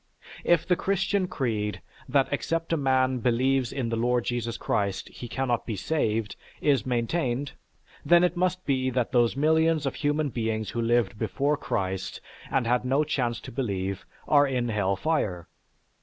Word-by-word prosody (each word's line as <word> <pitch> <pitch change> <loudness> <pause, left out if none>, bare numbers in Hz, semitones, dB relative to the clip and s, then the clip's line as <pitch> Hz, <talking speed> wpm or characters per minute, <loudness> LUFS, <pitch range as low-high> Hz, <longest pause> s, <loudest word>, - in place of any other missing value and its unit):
If 170 -2 +3
the 180 - +4
Christian 195 +1 0
creed, 110 - -2 0.3
that 140 -2 +3
except 165 +3 -1
a - - +4
man 130 -3 +2
believes 125 +1 +1
in 130 -4 -2
the 115 - -1
Lord 120 +1 +1
Jesus 120 -1 -2
Christ 100 -2 -1
he 120 - -8
cannot 125 -1 -1
be 110 - -2
saved, 110 - -1 0.2
is 140 -3 +2
maintained, 125 +2 -1 0.5
then 175 0 +5
it 180 0 +2
must 185 +1 0
be 130 -2 +1
that 125 -2 -1
those 120 0 +3
millions 160 +1 +3
of 135 - -1
human 145 0 0
beings 110 -4 -2
who 120 - -2
lived 115 -3 +1
before 145 +2 0
Christ 95 -9 -3 0.3
and 130 -3 +1
had 125 +1 +2
no 135 +4 +2
chance 125 -6 -1
to - - -9
believe, 100 -6 -3 0.2
are 145 -1 +5
in 125 -3 -1
hell 100 -3 +1
fire. 95 - -1
130 Hz, 165 wpm, -27 LUFS, 115-150 Hz, 0.5 s, then